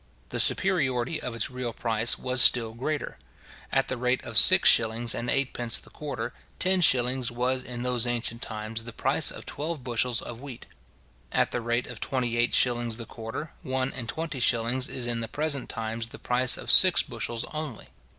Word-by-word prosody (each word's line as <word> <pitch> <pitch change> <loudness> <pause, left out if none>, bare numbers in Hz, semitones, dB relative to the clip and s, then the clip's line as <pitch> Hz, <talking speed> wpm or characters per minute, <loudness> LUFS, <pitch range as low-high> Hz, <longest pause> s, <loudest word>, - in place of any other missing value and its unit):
The - - -3
superiority 150 -6 0
of 125 - -5
its 115 +3 -2
real 125 -2 -5
price 115 0 0
was 130 0 +4
still 115 -4 +6
greater. 145 +6 -4 0.5
At 135 0 +1
the 130 - -3
rate 125 +1 0
of - - -6
six - - +8
shillings 115 +1 +4
and 120 +1 -4
eightpence 125 -3 0
the - - -9
quarter, 140 -7 -6 0.2
ten 185 0 +2
shillings 125 -4 +2
was 125 +2 -1
in 120 -1 -6
those 125 -1 +1
ancient 115 -1 -2
times 110 +1 -4
the 115 - -8
price - - +1
of - - -8
twelve 150 -1 -5
bushels 120 -1 0
of 120 0 -8
wheat. 135 -4 -10 0.7
At - - +1
the 120 - -3
rate 120 +1 -1
of 125 -3 -9
twenty 125 -3 -2
eight 120 +1 +1
shillings 120 -2 +1
the 115 - -7
quarter, 115 +8 -8
one 130 -3 -1
and 125 -3 -6
twenty 155 -4 -4
shillings 120 +2 +1
is 125 - -3
in 120 -1 -1
the 115 - -4
present 150 -1 -2
times 115 0 -4
the - - -11
price 125 +1 +1
of - - 0
six 185 -2 +7
bushels 115 -1 -4
only. 155 -7 -6
125 Hz, 190 wpm, -26 LUFS, 115-130 Hz, 0.7 s, six